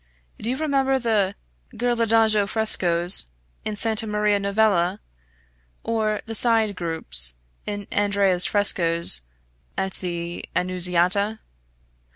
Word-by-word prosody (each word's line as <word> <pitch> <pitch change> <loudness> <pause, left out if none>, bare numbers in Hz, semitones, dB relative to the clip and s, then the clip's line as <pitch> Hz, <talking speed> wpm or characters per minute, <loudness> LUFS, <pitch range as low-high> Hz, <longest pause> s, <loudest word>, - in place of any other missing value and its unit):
Do 225 - -3
you 255 - -2
remember 270 -3 0
the 215 -6 -1 0.4
Ghirlandajo 225 -3 +1
frescoes 175 - +3 0.4
in 215 - -5
Santa 220 +1 +1
Maria 210 -1 0
Novella, 200 -2 0 0.8
or 215 -2 -2
the 225 - -7
side 225 -2 +2
groups 160 - 0 0.3
in 205 -1 -6
Andrea's 200 -3 +2
frescoes 170 - +2 0.6
at 190 0 -3
the 170 -1 -6
Annunziata? 180 +3 +1
205 Hz, 100 wpm, -22 LUFS, 180-220 Hz, 0.8 s, frescoes